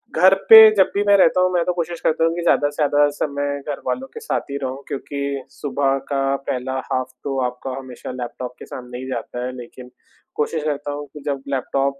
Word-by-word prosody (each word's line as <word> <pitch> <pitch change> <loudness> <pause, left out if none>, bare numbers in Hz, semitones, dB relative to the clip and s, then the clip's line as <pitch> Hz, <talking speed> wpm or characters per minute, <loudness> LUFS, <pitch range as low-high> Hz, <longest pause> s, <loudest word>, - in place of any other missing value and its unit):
घर 190 +1 +6 0.2
पे 225 - +12 0.2
जब 190 -2 +4
भी 200 +1 +1
मैं 205 - +7
रहता 185 -1 +4
हूँ, 185 0 +3
मैं 175 - +2
तो 180 - 0
कोशिश 170 -1 -3
करता 160 - +1
हूँ 165 - +1
कि 175 - -3
ज़्यादा 145 -4 +3
से 145 - -13
ज़्यादा 145 -1 +3
समय 145 -1 -2
घरवालों 255 - -4
के - - -7
साथ 450 - -2
ही 140 - -2
रहूँ 130 +1 -4
क्योंकि 140 -1 -4
सुबह 140 -1 -1
का 135 -1 +1 0.2
पहला 130 +1 -2 0.2
हाफ 130 0 -1
तो 135 -1 -2
आपका 125 +2 -5
हमेशा 130 -2 -8
लैपटॉप 125 0 -6
के - - -9
सामने 125 -1 -8
ही 130 - -6
जाता 125 0 -4
है। 125 - -3
लेकिन 125 +1 -11 0.5
कोशिश 150 +1 -1
करता 145 -1 -2
हूँ 145 0 -5
कि 150 - -9
जब 140 -2 -2
लैपटॉप 135 +1 -1
140 Hz, 215 wpm, -21 LUFS, 130-155 Hz, 0.5 s, पे